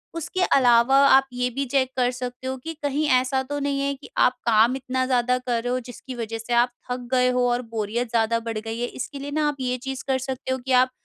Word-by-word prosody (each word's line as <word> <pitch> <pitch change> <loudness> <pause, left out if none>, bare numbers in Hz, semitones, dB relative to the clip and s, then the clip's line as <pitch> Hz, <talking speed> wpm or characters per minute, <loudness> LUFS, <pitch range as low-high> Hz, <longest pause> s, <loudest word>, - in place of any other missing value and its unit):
उसके 340 +3 -3 0.2
अलावा 245 +1 +5
आप 270 0 +5
ये 250 0 0
भी 275 +1 -1
चेक 260 -2 +2
कर 250 0 +2
सकते 250 +1 -6
हो 260 - -2
कि 325 +6 -7
कहीं 285 +2 0
ऐसा 260 +1 +1
तो 290 0 -2
नहीं 280 -1 -1
है 280 0 0
कि - - -14
आप 250 - +4
काम 230 +3 +4
इतना 260 -1 -2
ज़्यादा 250 -1 +2
कर 245 -2 -2
रहे 245 - -2
हो 255 - 0
जिसकी 255 +2 -9
वजह 225 -1 -4
से 230 +2 -4
आप 240 +1 +3 0.2
थक 250 -1 -4
गए 250 -1 +3
हो 250 0 +2
और 245 +1 0
बोरियत 225 +3 -2
ज़्यादा 230 0 +1
बढ़ 225 -1 -2
गई 225 +1 -5
है, 245 - -1
इसके 280 +2 -7
लिए 285 +1 -6
ना 300 0 +1
आप 295 - -1
ये 250 -1 -1
चीज़ 265 +1 -6
कर 265 - +2
सकते 260 0 -4
हो 260 - 0
कि 260 +1 -6
आप 255 0 +4
255 Hz, 255 wpm, -24 LUFS, 245-265 Hz, 0.2 s, अलावा